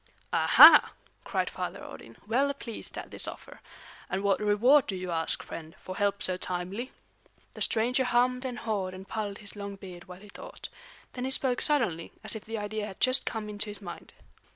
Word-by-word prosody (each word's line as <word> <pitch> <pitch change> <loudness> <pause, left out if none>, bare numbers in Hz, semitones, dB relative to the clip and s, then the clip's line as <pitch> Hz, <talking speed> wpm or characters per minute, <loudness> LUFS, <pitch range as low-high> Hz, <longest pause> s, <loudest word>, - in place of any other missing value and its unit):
"Aha!" - - +8 0.3
cried - - -1
Father - - -5
Odin, 115 0 -11
well 270 +6 +2
pleased 235 -5 -6
at - - -7
this - - 0
offer. - - -10 0.5
"And 190 +1 -2
what 200 -1 +2
reward 235 +7 +4
do 195 - -3
you 180 -1 -5
ask, 165 -1 +1
friend, 160 -1 -9
for 185 - -8
help 200 0 0
so 185 -1 +2
timely?" 185 +7 -4 0.6
The - - -11
stranger 245 +4 +1
hummed 250 +1 +2
and 250 -2 -4
hawed 195 -5 -3
and 190 +1 -10
pulled 205 -2 -4
his 205 0 -8
long 200 -1 -6
beard 180 -3 -11
while 180 +1 -11
he 210 - -14
thought. - - -10 0.4
Then 250 0 -4
he - - -1
spoke 260 -1 0
suddenly, 230 - 0
as 215 +1 +1
if 220 - -8
the 225 +1 -5
idea 210 0 -4
had 195 - -10
just 255 +1 +4
come 220 -2 -3
into 210 0 -3
his 205 - -7
mind. 185 -4 -9
210 Hz, 195 wpm, -28 LUFS, 190-245 Hz, 0.6 s, Aha